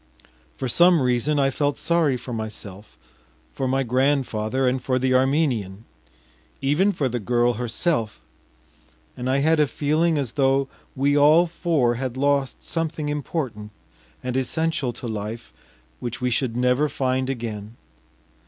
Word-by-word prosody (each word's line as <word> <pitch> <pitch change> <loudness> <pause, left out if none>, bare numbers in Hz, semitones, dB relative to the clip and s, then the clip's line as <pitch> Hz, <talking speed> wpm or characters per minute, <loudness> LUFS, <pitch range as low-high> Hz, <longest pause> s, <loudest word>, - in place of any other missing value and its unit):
For 130 - -3
some 175 +7 +5
reason 125 +4 +1
I 135 -1 +2
felt 145 +1 -1
sorry 165 -6 +1
for 125 0 -7
myself, 105 -2 -7 0.5
for 135 - -3
my 135 +1 +1
grandfather 130 -1 0
and 130 +1 0
for 130 0 +1
the 130 0 +1
Armenian, 130 -7 +1 0.7
even 150 +9 +2
for 145 -8 -1
the 125 -1 -2
girl 120 +2 +1
herself, 120 0 -1 1.0
and 125 +1 -4
I 135 - +2
had 160 0 +3
a 150 - +4
feeling 155 +4 +1
as 135 -5 -2
though 135 -1 +2 0.3
we 140 +1 +2
all 150 +4 +6
four 165 -7 +1
had 130 +1 -4
lost 140 -1 0
something 160 -2 -3
important 135 -7 -4 0.5
and 125 0 -3
essential 135 0 -1
to 120 - -7
life 110 +1 -6 0.5
which 120 -1 -5
we 125 -1 -1
should 120 -1 -1
never 125 +4 +2
find 130 -1 -1
again. 115 -4 -5
130 Hz, 145 wpm, -23 LUFS, 120-145 Hz, 1.0 s, all